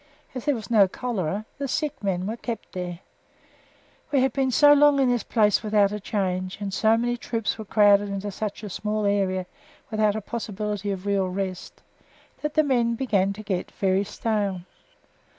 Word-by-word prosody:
As 255 0 -6
there 290 -2 +2
was 220 -1 -8
no 205 -4 +6
cholera, 205 -3 -3
the 280 - -2
sick 290 -1 -2
men 185 -2 -1
were 220 +3 -2
kept 235 -1 -6
here. 180 -1 -5 1.1
We 275 -3 +3
had 265 -2 +1
been 270 -1 +1
so 290 +4 +6
long 290 -1 +5
in 260 -2 +3
this 245 -2 +1
place 210 -3 +2
without 210 -2 +2
a 210 - -3
change, 185 -2 -2
and 200 -2 -4
so 220 +3 +3
many 240 +1 0
troops 230 -2 -2
were 220 - -6
crowded 205 -1 +4
into 200 +1 -4
such 210 +1 -5
a 210 - -5
small 210 +2 -2
area, 190 -2 +1 0.5
without 215 -1 +2
a 220 - -2
possibility 210 -2 -4
of 195 -1 -4
real 200 -2 +1
rest, 185 -1 -5 0.6
that 300 0 -3
the 310 - +5
men 240 -5 +1
began 200 -6 +1
to 215 +2 -9
get 190 -3 -2
very 190 0 +1
stale. 205 -3 -2
210 Hz, 185 wpm, -25 LUFS, 195-235 Hz, 1.1 s, no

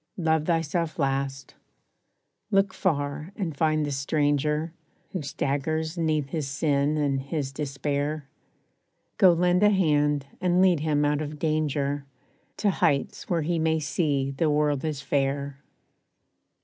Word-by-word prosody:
Love 160 -3 +1
thyself 165 -1 0
last. 135 -2 -2 1.0
Look 195 -2 +2
far 150 -1 -1
and 175 -8 -3
find 155 0 +1
the 145 - -3
stranger, 150 +3 0 0.4
Who 185 - -3
staggers 155 +3 -2
'neath 155 -4 0
his 155 -2 -2
sin 140 +1 +1
and 140 -2 0
his 140 -1 -3
despair; 145 +1 -3 0.9
Go 185 - +8
lend 180 +2 +2
a 210 - +6
hand, 150 -7 +2 0.2
and 180 0 +2
lead 185 -4 +4
him 150 -1 +1
out 145 0 +1
of 150 0 -5
danger, 145 -2 0 0.5
To 205 - +2
hights 145 -5 0
where 170 -3 +1
he 170 +2 0
may 160 0 +2
see 145 -3 0
the 155 +3 0
world 150 -2 +1
is 155 -3 -2
fair. 140 0 -1
150 Hz, 135 wpm, -26 LUFS, 140-160 Hz, 1.0 s, Go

